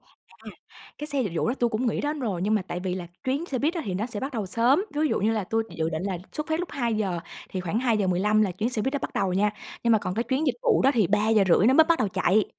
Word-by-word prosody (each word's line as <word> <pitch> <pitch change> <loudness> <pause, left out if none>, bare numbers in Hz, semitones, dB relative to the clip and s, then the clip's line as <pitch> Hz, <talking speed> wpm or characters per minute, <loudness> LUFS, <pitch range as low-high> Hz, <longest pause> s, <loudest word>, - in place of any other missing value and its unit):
À, - - -16 0.5
cái 295 - -5
xe 285 -3 0
dịch 200 -8 -3
vụ 170 - 0
đó 240 - +1
tui 240 - +2
cũng 225 +4 -1
nghĩ 230 - 0
đến 295 0 -2
rồi 200 -8 -2
nhưng 210 +3 +2
mà 210 - +1
tại 175 - -3
vì 185 -1 -2
là 180 -2 -5 0.2
chuyến 280 +6 -1
xe 265 - -2
buýt 305 +7 0
á 340 - -2
thì 185 - -3
nó 210 +5 -1
sẽ 225 -4 -6
bắt 275 +2 -4
đầu 215 -6 -3
sớm, 245 - +2
ví 300 - 0
dụ 310 - +1
như 215 +3 +2
là 215 -4 -1
tui 225 +3 0
dự - - -11
dự 160 0 0
định 160 +1 -3
là 190 -2 -2
xuất 300 - -4
phát 315 +2 0
lúc 355 - -4
2:00 215 -9 -1 0.3
thì 185 - -3
khoảng 185 +5 -1
2:15 210 -3 +2
là 205 - +1
chuyến 215 +7 -2
xe 225 -4 -2
buýt 265 - -1
đó 285 - 0
bắt - - -5
đầu 190 - 0
nha, 205 +3 +2 0.3
nhưng 235 - +4
mà 220 - +5
còn 180 -2 -4
cái 225 - 0
chuyến 265 +6 0
dịch - - +1
vụ 475 -4 +3
đó 270 - +5
thì 215 -5 +3
3:30 210 -1 +3
nó 260 - +5
mới 320 - +7
bắt 335 0 +2
đầu 215 - +1
chạy. 190 +2 +2
220 Hz, 310 wpm, -26 LUFS, 190-265 Hz, 0.5 s, mới